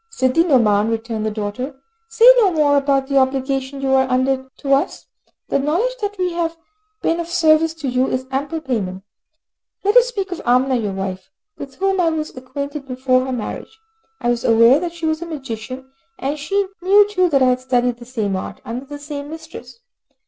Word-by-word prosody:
"Sidi 265 - +2
Nouman," 220 - +3
returned 225 -1 -2
the - - +1
daughter, 215 +6 -4 0.3
"say 450 +1 +3
no 420 -5 +5
more 300 -3 +3
about 275 -1 +2
the 275 0 +2
obligation 265 +1 -1
you 270 -1 0
are 265 0 +3
under 265 +1 0
to 275 -1 0
us. 275 - 0 0.4
The - - +1
knowledge 350 - 0
that 410 0 -3
we 365 -2 -1
have 335 -1 -2 0.5
been 330 +1 +1
of 340 - -3
service 325 -2 +3
to 305 -4 -5
you 255 +1 +1
is 255 0 -2
ample 285 +4 -2
payment. 195 -9 -3 0.8
Let 410 +3 +2
us - - +7
speak 395 -6 -4
of 355 - -5
Amina, 255 +2 +2
your 210 -4 -2
wife, 190 -1 -5 0.3
with 275 -2 -8
whom 390 +1 +1
I 335 - +3
was 310 -1 -4
acquainted 280 +2 -6
before 255 0 +1
her 265 - -4
marriage. 250 - -5 0.4
I 240 - -1
was 240 -1 -2
aware 230 +4 +5
that 345 0 -4
she 335 -1 -5
was 315 0 0
a 340 - -5
magician, 265 -3 -7 0.3
and 285 +3 -3
she 395 +7 0 0.2
knew 400 +3 +5
too 370 -3 +1
that 275 -4 +3
I 255 - +5
had 250 0 +1
studied 250 -2 0
the 240 - -11
same 220 -6 -2
art, 185 - -6
under 245 +4 -5
the 290 +1 -7
same 290 0 -7
mistress. 320 +8 -10
275 Hz, 200 wpm, -19 LUFS, 255-325 Hz, 0.8 s, us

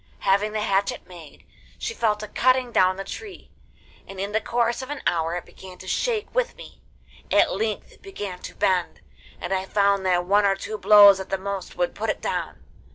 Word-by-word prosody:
Having 200 +2 +2
the 215 - -1
hatchet 200 -1 0
made, 170 -4 -14 0.3
she 445 - -4
fell 220 - +1
to 210 0 -8
cutting 255 +3 +2
down 185 -3 +3
the 195 - -5
tree, 400 - -9 0.6
and 195 -1 -9
in 200 +1 -3
the 220 +1 0
course 235 +2 0
of 260 - -8
an 290 -1 -6
hour 165 0 0
it 175 - -5
began 185 -1 -13
to 185 - -12
shake 445 - -1
with - - 0
me. - - -13 0.5
At - - +4
length 445 - -3
it - - -21
began 205 - -7
to - - -9
bend, 180 -2 0 0.4
and 190 - -3
I 190 0 -1
found 200 0 +2
that 175 -1 +2
one 205 +3 +3
or 195 -1 +3
two 210 +2 -6
blows 205 -2 +8
at 190 - -7
the 195 - -1
most 195 -1 -5
would - - -1
put - - -3
it - - -1
down. - - -4
200 Hz, 210 wpm, -24 LUFS, 190-235 Hz, 0.6 s, blows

